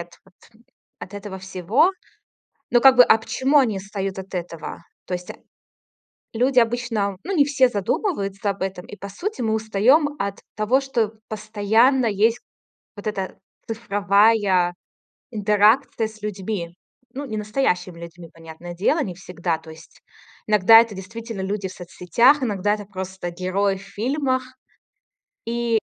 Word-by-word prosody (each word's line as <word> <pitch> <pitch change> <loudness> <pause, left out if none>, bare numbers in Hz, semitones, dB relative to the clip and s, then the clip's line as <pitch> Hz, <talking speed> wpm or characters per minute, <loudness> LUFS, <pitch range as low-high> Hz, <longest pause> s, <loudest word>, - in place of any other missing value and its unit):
от 170 0 -9
вот 195 -2 -24 0.6
от 195 - -10
этого 205 -1 -7
всего. 190 - +1 0.8
Ну 240 - +4
как 265 +1 +7
бы, 250 - +9
а 220 - +5
почему 265 +6 +1
они 230 -7 +2
устают 195 0 -5
от 190 0 -8
этого? 170 -3 -5 0.3
То 180 - -4
есть 180 0 -6 1.0
люди 250 +3 +3
обычно 225 -4 0
ну, 390 +2 -3
не 285 -4 +5
все 270 -3 +3
задумываются 200 - -2
об 200 -1 -4
этом, 190 -1 -4
и 205 - -10
по 200 -1 -8
сути 345 - -5
мы 220 -2 0
устаём 240 +8 +2
от 200 0 -3 0.2
того, 225 +6 +2
что 235 -5 -1 0.2
постоянно 220 +5 +2
есть 225 +2 +2 0.6
вот 205 +1 -7
эта 195 -3 -4 0.3
цифровая 205 -4 +2 0.6
интеракция 215 +3 +2
с 215 0 -15
людьми, 195 -4 -4 0.4
ну, 280 +2 -5
не 220 -5 -5
настоящими 205 -6 -1
людьми, 170 0 -10
понятное 165 +1 -10
дело, 295 - +1
не 180 -4 -6
всегда. 175 -2 -3
То 160 0 -13
есть 160 +1 -16 0.5
иногда 215 +1 +7
это 225 -4 -4
действительно 225 +2 -7
люди 195 0 -3
в 185 - -10
соцсетях, 190 - +2
иногда 205 -3 0
это 205 -1 -9
просто 190 -2 -6
герои 190 +2 -1
в 190 - -12
фильмах. 255 +6 -1 1.0
И, 235 -1 0
205 Hz, 145 wpm, -22 LUFS, 190-235 Hz, 1.0 s, бы